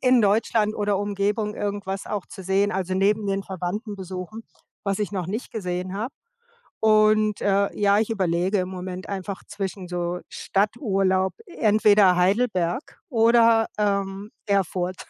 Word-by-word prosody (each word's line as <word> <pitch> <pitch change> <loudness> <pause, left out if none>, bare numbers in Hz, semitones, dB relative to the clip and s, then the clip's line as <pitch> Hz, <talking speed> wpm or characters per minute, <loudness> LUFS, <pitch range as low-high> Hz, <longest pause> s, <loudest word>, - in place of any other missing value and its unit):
in 255 -2 +4
Deutschland 215 +1 +2
oder 205 -1 0
Umgebung 205 +1 -1
irgendwas 200 -2 -4
auch 205 -3 -4
zu 190 - -10
sehen 195 +2 +1
also 185 0 -2
neben 205 +2 +2
den 195 0 -1
Verwandten 195 +4 -4
besuchen, 190 +4 -7 0.4
was 195 -1 0
ich 210 -1 -2
noch 185 -4 -2
nicht 215 +7 -4
gesehen 185 -3 -4
habe 225 +6 -3 0.7
und, 215 -1 +4
äh, 200 0 +1
ja, 205 0 +4
ich 220 - 0
überlege 190 -1 +1
im 180 0 -2
Moment 185 0 -6
einfach 195 0 -5
zwischen 195 -2 -5
so 175 0 -2
Stadturlaub, 195 -3 0
entweder 210 - +4
Heidelberg 185 - 0
oder, 230 -2 +4
ähm, 200 -1 -1 0.2
Erfurt. 185 -2 0
200 Hz, 140 wpm, -24 LUFS, 185-215 Hz, 0.7 s, in